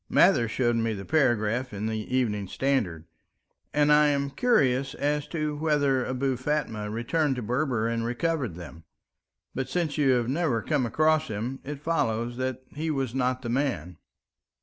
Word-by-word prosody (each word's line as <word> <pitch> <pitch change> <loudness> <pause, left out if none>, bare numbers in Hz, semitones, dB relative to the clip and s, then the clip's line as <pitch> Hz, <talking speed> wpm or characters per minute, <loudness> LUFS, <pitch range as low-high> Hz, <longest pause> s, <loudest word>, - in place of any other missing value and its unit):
Mather 115 - +5
showed 120 +1 +1
me 115 -1 0
the 100 -2 -6
paragraph 125 -4 +1
in 105 +1 -4
the 110 0 -1 0.2
Evening 105 -6 0
Standard. 95 - -1 0.7
And 150 0 +4
I 150 0 +6
am 140 -1 0
curious 135 - +2
as 145 0 -1
to 150 -1 -2
whether 145 -4 +1
Abou 130 0 -1
Fatma 125 -6 -2
returned 135 +6 0
to 125 - -4
Berber 125 -1 0
and 115 0 -1
recovered 125 - -1
them. 85 -2 -10 0.7
But 130 0 -3
since 160 -4 -1
you 135 -3 +4
have 120 -2 +1
never 135 -5 0
come 145 -6 0
across 155 +5 +2
him, 120 +4 -4
it 145 0 -7
follows 120 -7 0
that 130 0 -3
he 160 +2 -3
was 135 -5 -1
not 130 0 0
the 120 - -3
man." 120 - -1
130 Hz, 165 wpm, -27 LUFS, 115-145 Hz, 0.7 s, I